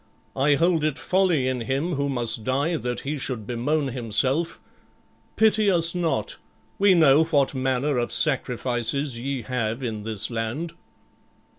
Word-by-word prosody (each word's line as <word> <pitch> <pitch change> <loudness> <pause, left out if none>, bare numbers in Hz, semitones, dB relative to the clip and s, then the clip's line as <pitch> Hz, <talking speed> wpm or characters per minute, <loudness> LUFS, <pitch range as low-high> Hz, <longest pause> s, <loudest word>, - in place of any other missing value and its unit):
I 145 +2 +3
hold 165 +1 +2
it 155 -1 0
folly 180 -9 +1
in 130 -2 -1
him 135 +9 -1
who 140 -1 -1
must 120 -4 -2
die 140 +8 0
that 125 -5 -3
he 145 +1 -4
should 125 -5 -4
bemoan 135 +5 -1
himself. 130 +6 0 0.8
Pity 215 -1 +3
us 170 -3 +3
not; 175 - -1 0.4
we 195 -1 +5
know 155 -2 +6
what 145 -5 +1
manner 130 +1 0
of 120 - -2
sacrifices 130 -1 -1
ye 135 -1 -3
have 115 0 -3
in 110 -3 -3
this 110 +1 -2
land." 120 +9 -3
135 Hz, 145 wpm, -24 LUFS, 120-160 Hz, 0.8 s, know